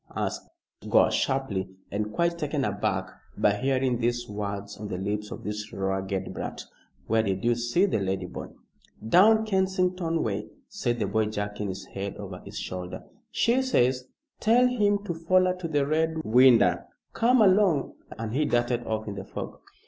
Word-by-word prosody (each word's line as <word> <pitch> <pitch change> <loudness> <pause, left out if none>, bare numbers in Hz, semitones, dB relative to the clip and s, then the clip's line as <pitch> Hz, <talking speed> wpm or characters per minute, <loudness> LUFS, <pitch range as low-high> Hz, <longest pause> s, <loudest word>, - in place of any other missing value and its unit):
asked - - -3 0.4
Gore, - - +5
sharply, 120 -9 -1 0.2
and 105 +1 -2
quite 170 +9 +1
taken 145 -3 -1
aback 100 -1 -1 0.3
by 105 - +3
hearing 130 +2 0
these 120 0 -1
words 100 -1 -5
on 105 - -6
the 95 - -4
lips 105 +2 -3
of - - -8
this 105 +1 -5
ragged 95 0 -2
brat. - - -6 0.4
"Where 110 +1 +2
did 95 -3 -2
you 120 - +4
see 120 +11 +1
the 185 - 0
lady, 95 -1 -2
boy?" - - -7 0.6
"Down 220 - +6
Kensington 185 -4 0
way," 105 -3 -2 0.2
said 120 0 -2
the 110 - 0
boy 110 +2 +1
jerking 105 -1 -3
his 95 0 -6
head 100 0 -6
over - - -7
his - - -9
shoulder. 90 -1 -5 0.3
"She 235 +2 +2
says, 130 - +2 0.3
'Tell 235 +3 +4
him 205 -4 +1
to 180 - -3
foller 185 +3 +2
to 180 -2 -4
the 145 -3 +1
Red 160 +2 0
Winder.' 115 - +5 0.3
Come 245 +2 +3
along!" 185 -7 +3 0.2
and 110 0 -4
he 150 +4 +2
darted 120 -2 +1
off 110 0 -2
in 105 - -3
the - - -6
fog. - - -7
120 Hz, 170 wpm, -27 LUFS, 105-170 Hz, 0.6 s, Down